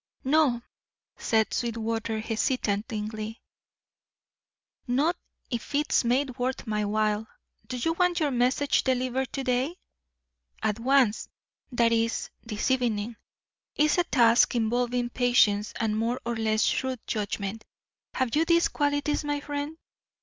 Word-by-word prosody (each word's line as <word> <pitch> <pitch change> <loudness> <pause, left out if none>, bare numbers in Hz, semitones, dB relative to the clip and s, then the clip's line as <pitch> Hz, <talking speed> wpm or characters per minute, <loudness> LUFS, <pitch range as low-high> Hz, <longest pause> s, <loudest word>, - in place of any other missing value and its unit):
"No," 265 -4 +3 0.5
said 220 -2 +1
Sweetwater, 225 -1 -2
hesitatingly, 215 -1 -2 1.5
"not 285 +8 +2 0.4
if 235 +4 -4
it's 295 -1 +2
made 255 +2 0
worth 255 +1 -2
my 210 -2 -1
while. 215 +1 0 0.4
Do 255 - -4
you 325 +7 0
want 360 0 +2
your 300 -3 +1
message 255 +3 +2
delivered 255 0 0
to 270 - -2
day?" 255 +6 0 0.9
"At 215 0 0
once. 255 -3 +2 0.4
That 235 -2 +3
is, 230 0 0
this 220 +2 -2
evening. 235 -3 0 0.6
It's 300 +3 +3
a - - +4
task 240 -6 +4
involving 240 +1 0
patience 230 -5 +3
and 220 -2 0
more 230 +3 0
or 235 0 -1
less 220 -1 +1
shrewd 260 -2 0
judgment. 205 0 -3 0.5
Have 260 -1 0
you 310 - +4
these 335 +1 +3
qualities, 290 0 0
my 290 0 -1
friend? 290 +2 -4
245 Hz, 125 wpm, -27 LUFS, 220-275 Hz, 1.5 s, a